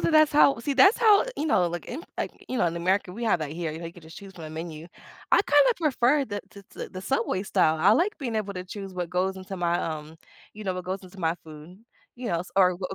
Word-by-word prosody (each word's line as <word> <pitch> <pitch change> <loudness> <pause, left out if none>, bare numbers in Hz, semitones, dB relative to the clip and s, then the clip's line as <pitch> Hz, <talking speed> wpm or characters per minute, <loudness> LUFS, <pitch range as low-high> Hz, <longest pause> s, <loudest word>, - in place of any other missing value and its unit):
that - - +1
that's 310 -1 +5
how 280 -3 +5
see, 280 +4 -1
that's 275 - +6
how 430 -2 +5
you 305 - -1
know, 180 - +3
like, 175 0 -5
in, 295 +8 -6
like, - - -3 0.2
you 255 - -2
know, 175 - +2
in 170 0 -2
America, 185 +1 0
we 235 +4 -5
have 180 -7 +2
that 150 - -3
here, 165 -2 -3
you 160 - -7
like, 170 -1 -6
you - - -13
can 175 - -14
just 160 0 -13
choose 195 -1 -11
from 165 -4 -9
a 155 - -7
menu, 160 0 -7 0.5
I - - +7
kinda - - +5
prefer 290 -3 +2
the 205 -3 -5
t 200 - -13
t - - -7
the 185 0 -8
Subway 215 -6 -1
style, 160 -5 +2
I 195 +6 +5
like 375 - +2
being 245 -7 -3
able 205 -2 -3
to 180 - -5
choose 195 0 -8
what 175 -1 -4
goes 190 +1 0
into 190 0 -7
my, 175 0 0
um 155 0 -5 0.4
you 215 - -9
know, 190 - 0
what 180 - -5
goes 190 +1 -4
into 185 +1 -12
my 165 0 +1
food, 155 +4 -12 0.4
you 245 -1 -5
know, 170 - 0
s 180 - -9
or 185 -2 +5
what, 185 0 -5
uh, - - -4
185 Hz, 285 wpm, -26 LUFS, 170-235 Hz, 0.5 s, I